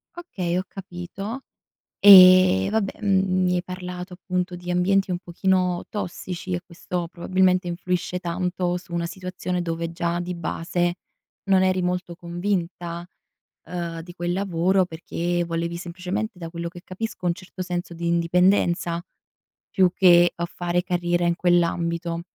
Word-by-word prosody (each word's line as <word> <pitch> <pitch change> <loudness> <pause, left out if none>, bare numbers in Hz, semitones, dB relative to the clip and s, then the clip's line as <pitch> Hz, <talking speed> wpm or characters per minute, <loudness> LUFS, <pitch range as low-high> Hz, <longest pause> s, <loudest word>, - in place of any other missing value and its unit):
Okay, 180 - -3
ho 185 - 0
capito; 195 +6 -7 0.6
eh, 185 - +9
vabbè, 220 -2 -1
mhmm, 190 -2 +2
mi 180 0 +2
hai 175 - -1
parlato 180 0 -7
appunto 180 0 -3
di 175 0 -8
ambienti 185 +2 +2
un 175 - -1
pochino, 180 0 0
tossici 185 -2 -5
e 175 - -2
questo, 175 0 -4
probabilmente, 185 +1 +1
influisce 180 +1 -2
tanto 180 0 -1
su 175 -1 -11
una 170 0 -1
situazione 180 0 -4
dove 165 0 -3
già 170 0 -1
di 180 +1 -4
base, 175 +1 -1 0.5
non 190 -1 +3
eri 185 0 +2
molto 180 -1 -2
convinta, 175 -1 -3 0.6
uhm, 170 -2 -4
di 175 +1 -11
quel 175 0 -2
lavoro 190 0 +2
perché, 175 +1 -2
volevi 170 0 -3
semplicemente, 185 +4 -4
da 165 -1 -6
quello 170 0 -5
che 175 0 -12
capisco, 190 0 -6
un 170 - +2
certo 185 0 -10
senso 175 -1 -4
di 170 0 -4
indipendenza, 170 0 +2 0.7
più 185 -3 +4
che 175 -2 +6
a 170 - -2
fare 175 0 -1
carriera 175 -1 0
in 170 - +2
quell'ambito. 170 -1 +1
180 Hz, 145 wpm, -24 LUFS, 170-185 Hz, 0.7 s, eh